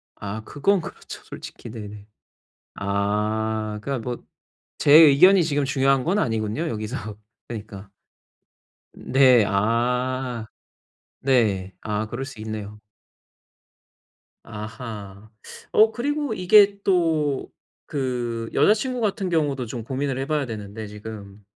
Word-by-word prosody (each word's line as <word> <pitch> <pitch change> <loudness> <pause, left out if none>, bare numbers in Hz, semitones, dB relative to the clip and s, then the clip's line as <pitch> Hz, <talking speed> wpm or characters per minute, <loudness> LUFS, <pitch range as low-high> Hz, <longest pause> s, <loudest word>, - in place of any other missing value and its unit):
아 105 +2 -6
그건 195 +7 +1
그렇죠, - - -10
솔직히. - - -10
네네. 105 -2 -9 0.7
아 105 +2 -1
그러니까 135 +2 -2
뭐 120 +1 -5 0.6
제 145 - +3
의견이 165 +5 +8
지금 145 -2 0
중요한 135 -1 +2
건 190 +8 +1
아니군요, 110 - -1
여기서. 110 -2 -5 0.3
그러니까. 105 -3 -8 1.0
네, 130 -3 +4
아 120 +3 0 0.7
네. 105 -8 +1
아 105 0 -2
그럴 120 +4 -5
수 135 -5 -10
있네요. 105 -1 -6 1.6
아하. 105 -2 -8 0.4
어 220 +1 +5
그리고 290 +2 -2
이게 200 +1 +5
또 160 -7 +1 0.4
그 120 -4 -3
여자 210 - +6
친구 250 +3 -3
같은 205 -3 -1
경우도 145 -7 0
좀 120 0 -5
고민을 135 +2 -2
해 135 - -2
봐야 150 -2 -1
되는데 105 -1 -7
지금. 105 -1 -10
120 Hz, 220 characters per minute, -23 LUFS, 110-145 Hz, 1.6 s, 의견이